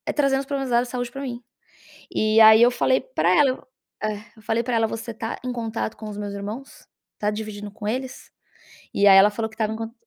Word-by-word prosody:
trazendo 275 -2 +2
os - - -8
problemas 270 -1 -3
dela 240 0 +3
de 250 - -8
saúde 245 -1 -4
pra 275 - -7
mim. 245 -3 -6 0.7
E 215 +1 +3
aí, 220 0 +9
eu 240 +1 +6
falei 260 +1 +2
pra - - -1
ela, 290 -4 +5
eu 255 - -9 0.4
é, 215 0 -1 0.2
eu - - -16
falei 225 +2 0
pra 240 0 -1
ela: 225 -1 +2
"Você 225 +1 -6
tá 225 +1 -5
em 250 - -2
contato 225 -2 -4
com 215 -1 -8
os 205 - -7
meus 205 -1 -5
irmãos? 210 +7 -8 0.3
Tá 210 - 0
dividindo 210 -1 -6
com 210 0 -7
eles?" 255 +3 -5 0.6
E 200 - +3
aí 195 - +8
ela 200 +2 +7
falou 220 +1 -3
que 220 - -17
estava 220 -1 -1
em - - -4
cont 225 0 -6
225 Hz, 240 wpm, -23 LUFS, 215-250 Hz, 0.7 s, aí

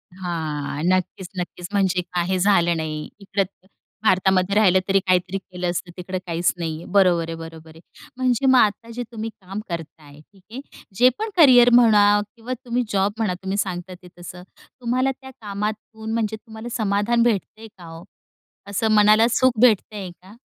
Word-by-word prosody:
हां, 155 -5 -4
नक्कीच-नक्कीच. 180 -1 -3
म्हणजे 190 -3 +1
काही 180 +1 0
झालं 175 -4 +3
नाही. 155 -1 -4
इकडं 200 0 -1 0.6
भारतामध्ये 190 -1 +2
राहिलं 190 -3 +5
तरी 195 0 +3
काहीतरी 185 +1 +1
केलं 180 -2 -5
असतं. 175 0 -4
तिकडं 185 +1 -5
काहीच 170 +1 0
नाहीये, 165 -1 -5
बरोबर 175 -4 +3
आहे, 165 - -4
बरोबर 165 0 -10
आहे. 160 - -15 0.4
म्हणजे 255 0 0
मग 260 -1 +6
आता 215 +2 +1
जे 245 - -3
तुम्ही 225 0 -5
काम 195 +3 -7
करताय, 155 -3 -8
ठीक 190 +4 -22
आहे. 260 +3 -7 0.3
जे 250 +4 +6
पण 440 +1 -2
करिअर 250 -6 +7
म्हणा 220 -4 +6 0.3
किंवा 235 +2 -6
तुम्ही 245 +1 0
जॉब 195 +1 +1
म्हणा, 215 -5 0
तुम्ही 190 +1 -2
सांगता 185 -2 -3
ते. 180 - -12
तसं 180 +1 -10 0.4
तुम्हाला 255 +3 0
त्या 265 0 -11
कामातून, 215 +2 -5
म्हणजे 220 -1 -1
तुम्हाला 220 +1 -10
समाधान 215 +3 +1
भेटतंय 220 0 -2
का 175 - -13
हो? 165 0 -10 0.7
असं 215 +2 0
मनाला 215 +2 +5
सुख 255 -3 +2
भेटतंय 210 -5 +2
का? 190 +3 -16
195 Hz, 160 wpm, -22 LUFS, 175-220 Hz, 0.7 s, करिअर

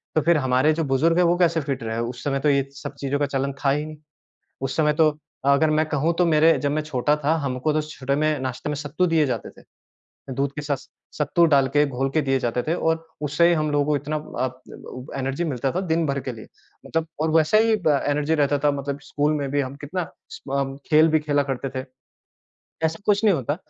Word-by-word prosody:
तो 155 - +4
फिर 170 +1 +3
हमारे 130 +3 +2
जो 165 - -1
बुज़ुर्ग 155 +6 +2
हैं, 180 - +4
वो 175 +1 +3
कैसे 170 -2 +2
फिट 135 -3 -3
रहे? 115 0 -3
उस 120 +1 -4
समय 135 -1 0
तो 150 - +2
ये 140 -1 +2
सब 145 0 -7
चीज़ों 140 0 -1
का 145 - +2
चलन 135 +1 0
था - - +5
ही 150 +2 0
नहीं। 155 0 -9 0.6
उस 135 -1 -3
समय 150 -1 +3
तो 155 -1 +3 0.4
अगर 155 +2 +2
मैं 155 +1 +2
कहूँ, 155 +3 +1
तो 180 - +5
मेरे 160 0 +4
जब 145 -1 -1
मैं 155 +1 0
छोटा 150 0 +1
था, 160 +3 +3
हमको 130 +3 -1
तो 155 - +1
छोटे 140 -3 -3
में, 155 0 +1
नाश्ते 130 +2 -4
में 150 - -1
सत्तू 145 +5 -1
दिए 155 -2 +4
जाते 130 - -3
थे। - - -25 0.7
दूध 140 +1 -1
के 150 - -3
साथ 140 -2 -3 0.3
सत्तू 150 +3 +3
डाल 135 -1 +4
के 145 - +6
घोल 135 0 -2
के 160 - +4
दिए 135 -1 +1
जाते 120 +1 -1
थे, 160 - -1
और 165 -1 -1 0.2
उससे 150 +3 +3
ही 175 - +4
हम 155 -1 0
लोगों 145 0 +2
को 150 - +2
इतना 150 +2 -3
अ, 130 -4 -3 0.2
ने - - -10
बउ 125 0 -9
एनर्जी 135 +5 -2
मिलता 135 -4 -1
था, 185 - -1
दिन 165 -3 0
भर 140 0 -1
के 130 0 -5
लिए। 110 -2 -11 0.4
मतलब, 165 0 -1
और 160 0 +1
वैसा 160 +7 +4
ही 225 0 +4
ब 145 -3 +4
एनर्जी 145 +2 +1
रहता 145 -1 +2
था, 145 - +5
मतलब 140 0 -4
स्कूल 145 +1 0
में 140 -2 -2
भी 145 +1 +1
हम 135 0 -4
कितना 175 +3 -4 0.2
स - - -9
म 135 - -2
अम, 135 0 -3
खेल 155 +1 +6
भी 155 0 +3
खेला 145 -1 +1
करते 135 +1 -3
थे। - - -7 1.0
ऐसा 160 +1 -3
कुछ 205 0 +3
नहीं 205 - +5
होता। 145 +1 -2
145 Hz, 245 wpm, -23 LUFS, 135-155 Hz, 1.0 s, के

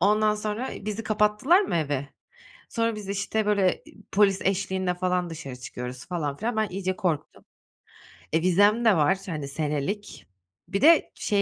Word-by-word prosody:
Ondan 210 +3 +3
sonra 215 +4 -3
bizi 215 +1 -3
kapattılar 215 - +3
mı 385 - -1
eve? 145 -3 -1 0.6
Sonra 230 -1 0
biz 205 -2 -8
işte 205 +2 -1
böyle 200 -3 +3
e - - -7 0.3
polis 195 -1 +3
eşliğinde 190 -1 0
falan 180 -1 -1
dışarı 135 -5 -7
çıkıyoruz 125 -1 -7
falan 155 -6 -3
filan. 225 +4 -2
Ben 215 -2 +1
iyice 185 0 -3
korktum. 165 -6 -3 0.9
E, 160 - +3
vizem 205 +6 +4
de 220 -4 +6
var, 160 +6 +3
hani, 155 -5 -4
senelik. 150 +8 -3 0.4
Bir 195 +2 -2
de 325 +2 +6
şey 205 -2 +1
195 Hz, 160 wpm, -26 LUFS, 165-210 Hz, 0.9 s, de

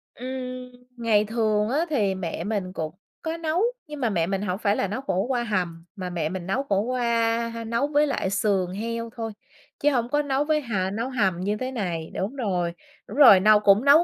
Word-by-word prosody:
Ừm. 255 0 -6 0.3
Ngày 220 -3 +3
thường 215 -1 +1
á, 300 +7 +1
thì 210 -10 +1
mẹ 170 -3 -4
mình 195 -3 -2
cũng 155 -2 -4 0.3
có 325 +1 -3
nấu, 330 +2 0 0.3
nhưng 300 -1 -7
mà 240 - +1
mẹ 170 -5 0
mình 195 +1 -1
hổng 185 -2 -2
phải 205 -2 +2
là 195 - 0
nấu 215 +7 -4
khổ 195 -7 0
qua 245 -2 +1
hầm, 175 -6 -2
mà 185 -3 -5
mẹ 165 -3 -2
mình 185 -1 -5
nấu 260 +8 0
khổ 200 -7 +1
qua, 230 -1 +1 0.2
ha, 230 - -5
nấu 235 +5 0
với 295 0 +3
lại 230 -9 -1
sườn 195 -2 +1
heo 230 +4 -4
thôi, 225 -2 -4 0.5
chứ 295 +1 +3
hông 240 -2 0
có 295 +3 +2
nấu 280 0 0
với 305 0 +1
hà 195 -7 -1
nấu 230 +5 -2
hầm 195 -9 +1
như 205 +3 -1
thế 255 +3 -3
này, 175 -9 -3
đúng 205 +9 -3
rồi. 180 -8 -1 0.3
Đúng 220 - -8
rồi, 245 -10 +9
nâu 210 +2 +6
cũng 210 +4 +4
nấu 300 +5 +7
220 Hz, 220 wpm, -25 LUFS, 190-255 Hz, 0.5 s, rồi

